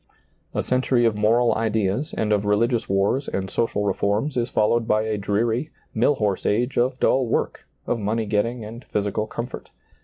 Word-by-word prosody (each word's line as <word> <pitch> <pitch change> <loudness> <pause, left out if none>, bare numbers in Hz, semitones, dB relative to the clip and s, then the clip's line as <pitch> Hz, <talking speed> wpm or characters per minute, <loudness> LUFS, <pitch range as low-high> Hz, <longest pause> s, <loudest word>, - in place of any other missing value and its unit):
A - - 0
century 125 -1 +2
of 115 -2 +2
moral 115 +3 +3
ideas 110 +4 0
and 105 -1 +1
of 105 -1 +1
religious 115 +3 +1
wars 100 +8 +1
and 95 0 -3
social 105 -3 0
reforms 105 +8 0
is 120 0 0
followed 115 +1 +1
by 110 0 +2
a 110 -1 -1
dreary, 110 +7 0 0.2
mill 120 +6 +3
horse 105 -6 -1
age 120 +5 0
of 125 +2 +1
dull 130 -2 +2
work, - - -2 0.2
of 120 - -1
money 110 +2 -1
getting 110 +3 -1
and 115 +4 -9
physical 105 +1 -1
comfort. 120 +3 -6
110 Hz, 175 wpm, -23 LUFS, 105-120 Hz, 0.2 s, moral